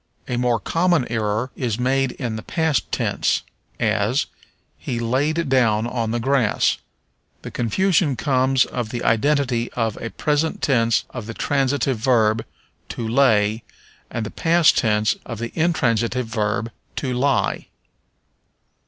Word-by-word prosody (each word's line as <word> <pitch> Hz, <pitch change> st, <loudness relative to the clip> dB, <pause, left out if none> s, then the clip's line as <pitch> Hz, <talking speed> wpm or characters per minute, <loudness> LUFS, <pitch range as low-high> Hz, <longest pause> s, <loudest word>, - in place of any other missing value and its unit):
A 125 Hz, -, -2 dB
more 120 Hz, -1 st, +1 dB
common 165 Hz, -, +1 dB
error 110 Hz, +2 st, -1 dB
is 115 Hz, -5 st, -2 dB
made 130 Hz, +1 st, +1 dB
in 120 Hz, -4 st, -4 dB
the 110 Hz, -, -5 dB
past 160 Hz, +2 st, -1 dB
tense, -, -, 0 dB, 0.4 s
as, -, -, +1 dB, 0.5 s
"He 120 Hz, -, -3 dB
laid 145 Hz, +8 st, 0 dB
down 115 Hz, -5 st, +2 dB
on 120 Hz, -2 st, -2 dB
the 120 Hz, +1 st, -1 dB
grass." 130 Hz, -3 st, +1 dB, 0.6 s
The -, -, -7 dB
confusion 165 Hz, -, +1 dB
comes 130 Hz, -1 st, +2 dB
of 120 Hz, -3 st, -4 dB
the 120 Hz, +1 st, -4 dB
identity 125 Hz, 0 st, +1 dB
of 115 Hz, -3 st, -1 dB
a 115 Hz, -, -4 dB
present 150 Hz, +8 st, -1 dB
tense 115 Hz, -4 st, +2 dB
of 120 Hz, -4 st, -7 dB
the 115 Hz, -, -6 dB
transitive 135 Hz, -3 st, 0 dB
verb 110 Hz, -2 st, +2 dB, 0.5 s
to 115 Hz, -, -4 dB
lay 110 Hz, -3 st, +3 dB, 0.5 s
and 115 Hz, -2 st, -3 dB
the -, -, -6 dB
past 165 Hz, -1 st, +3 dB
tense 105 Hz, -2 st, +2 dB
of 115 Hz, -, -7 dB
the 115 Hz, +1 st, -5 dB
intransitive 125 Hz, -7 st, +1 dB
verb 110 Hz, 0 st, -2 dB, 0.2 s
to 130 Hz, -2 st, -2 dB
lie. 135 Hz, +2 st, 0 dB
125 Hz, 135 wpm, -22 LUFS, 115-140 Hz, 0.6 s, lay